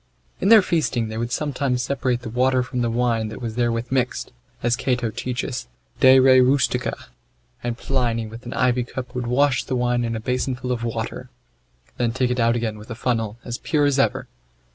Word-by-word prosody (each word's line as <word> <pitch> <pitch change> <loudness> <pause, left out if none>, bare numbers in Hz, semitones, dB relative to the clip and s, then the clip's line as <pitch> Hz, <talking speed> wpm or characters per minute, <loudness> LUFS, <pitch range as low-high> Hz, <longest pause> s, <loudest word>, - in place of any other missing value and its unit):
In 195 - +1
their 220 -3 +8
feasting 135 -10 0
they 110 - -5
would 120 +1 -3
sometimes 135 -3 -1
separate 130 -2 -1
the 115 - -5
water 130 +1 +2
from 125 0 -3
the 120 - +1
wine 115 -1 0
that 110 - -7
was 115 -3 -4
therewith 120 0 -1
mixed, 125 -2 -1 0.3
as 120 0 +2
Cato 125 -3 -1
teacheth, 125 +2 -4 0.3
De 130 0 +7
re 130 0 +7
rustica, 125 -1 +2 0.7
and 120 -1 -2
Pliny 120 -4 -1
with 115 +3 -10
an - - -5
ivy 125 -1 +2
cup 125 +1 -7
would 125 -1 -3
wash 130 +2 +2
the 130 - -3
wine 120 -1 +1
in 115 -1 -2
a - - -3
basinful 125 +2 -2
of 120 -1 -2
water, 115 +2 -4 0.7
then 120 -2 0
take 130 -1 0
it 125 - -1
out 115 0 +3
again 110 -3 -2
with 105 - -13
a 115 - -5
funnel 115 -2 -1
as 120 -1 -4
pure 150 -3 +1
as 140 -1 +2
ever. 135 - +1
125 Hz, 200 wpm, -22 LUFS, 115-130 Hz, 0.7 s, their